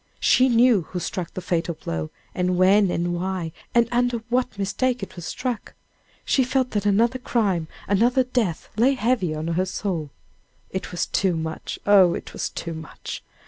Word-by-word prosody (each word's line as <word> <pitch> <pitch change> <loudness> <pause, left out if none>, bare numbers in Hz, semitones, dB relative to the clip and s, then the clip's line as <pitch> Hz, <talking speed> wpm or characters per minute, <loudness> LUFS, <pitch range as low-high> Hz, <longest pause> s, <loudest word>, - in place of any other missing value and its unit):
She 260 +1 +4
knew 235 -3 +5
who 180 +2 -6
struck 175 0 -4
the 185 - -3
fatal 170 -1 0
blow, 80 - -4 0.2
and 180 0 0
when 195 +2 +5
and 175 0 -1
why, 180 -1 -2 0.2
and 235 -1 +5
under 245 0 +2
what 245 -3 0
mistake 240 +4 0
it - - -7
was 175 -2 -7
struck! 245 +1 -4 0.5
She 265 - +3
felt 255 0 0
that 205 -1 0
another 230 +5 +3
crime, 200 -10 0 0.2
another 240 +6 +3
death 245 -9 -1
lay 260 +5 +4
heavy 220 -9 +1
on 155 +2 -3
her 175 +3 +1
soul! 180 -6 -3 0.6
It 190 -1 -4
was 175 - -1
too 190 -3 +1
much! 160 0 -4
oh! 195 -4 +6
it - - -7
was - - -2
too 170 - -5
much! 160 -1 -7
195 Hz, 175 wpm, -24 LUFS, 175-240 Hz, 0.6 s, oh